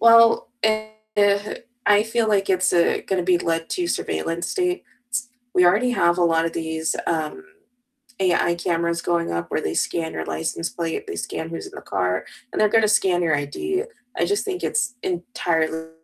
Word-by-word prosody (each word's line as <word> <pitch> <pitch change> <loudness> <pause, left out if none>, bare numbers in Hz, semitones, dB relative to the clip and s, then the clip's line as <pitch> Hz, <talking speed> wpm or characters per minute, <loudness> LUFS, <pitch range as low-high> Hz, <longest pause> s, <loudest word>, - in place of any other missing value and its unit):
Well, 230 0 +6 0.2
a 215 0 +1 0.2
uh, 205 0 +3 0.3
I 205 0 +6
feel 225 +1 0
like 195 -2 +2
it's, 185 0 +2
uh, 170 -1 +3
gonna 190 -2 0
be 175 0 +3
led 165 -1 -1
to 355 -1 -1
surveillance 170 - -2
states. 250 -9 -3 0.3
We 180 - +5
already 210 +8 +4
have 175 -6 +3
a 175 - +4
lot 165 -1 +3
of 165 - -1
these, 160 -1 -2
um, 165 - -2 0.8
AI 175 -2 +3
cameras 170 -1 0
going 170 -1 0
up 85 0 -3
where - - 0
they 80 - -2
scan 160 - -1
your - - -4
license 165 +1 -2
plate, 165 -1 -4
they - - -4
scan 85 - -4
who's 165 - -5
in - - -10
the - - -8
car, 90 0 -1 0.3
and - - -1
they're 215 - +5
gonna 225 0 +4
scan 185 -4 +3
your 160 -2 +3
ID. 360 - -2 0.3
I - - +1
just 405 +1 0
think 380 -2 -3
it's 230 +1 0
entirely 165 -3 -1
175 Hz, 185 wpm, -23 LUFS, 165-220 Hz, 0.8 s, Well